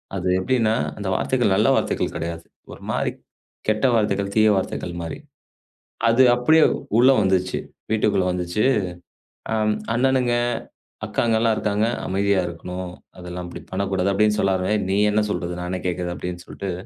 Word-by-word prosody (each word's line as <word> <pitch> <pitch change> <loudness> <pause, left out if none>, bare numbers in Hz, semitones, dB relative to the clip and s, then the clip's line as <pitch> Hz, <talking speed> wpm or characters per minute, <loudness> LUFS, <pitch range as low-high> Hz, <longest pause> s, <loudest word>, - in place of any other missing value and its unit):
அது - - -2
எப்படின்னா 110 +1 +1 0.2
அந்த 100 - -5
வார்த்தைகள் 120 -6 +1
நல்ல 105 +5 +3
வார்த்தைகள் - - -1
கிடையாது. 85 0 -5 0.3
ஒரு - - -13
மாரி - - 0 0.6
கெட்ட 110 +4 +1
வார்த்தைகள், 100 -2 0
தீய 110 0 +5
வார்த்தைகள் 90 -1 -3
மாதிரி. 80 -1 -5 0.9
அது 125 +3 +5
அப்படியே 155 +6 +4 0.4
உள்ள 130 +2 +7
வந்துச்சு. 95 -1 +1 0.3
வீட்டுக்குள்ள 105 -3 +2
வந்துச்சு. 90 +3 -1 0.9
அ - - +1 0.4
அண்ணனுங்க, 130 -1 +2 0.7
அக்காங்க 115 -1 +1
எல்லாம் 115 -1 +2
இருக்காங்க. 105 +1 0 0.2
அமைதியா 100 0 +1
இருக்கணும். 90 +2 -6 0.3
அதெல்லாம் 90 0 -6
அப்படி - - -9
பண்ணக்கூடாது. 95 0 0
அப்படின்னு 105 +1 +2
சொல்லாம 95 +1 +1 0.2
நீ 100 - +2
என்ன 105 0 +2
சொல்றது 90 -2 -3
நான் 90 - -4
என்ன 95 - -2
கேக்குறது 90 0 -2
அப்படின்னு 90 0 -6
சொல்லிட்டு 95 -2 -5
100 Hz, 140 wpm, -22 LUFS, 90-110 Hz, 0.9 s, உள்ள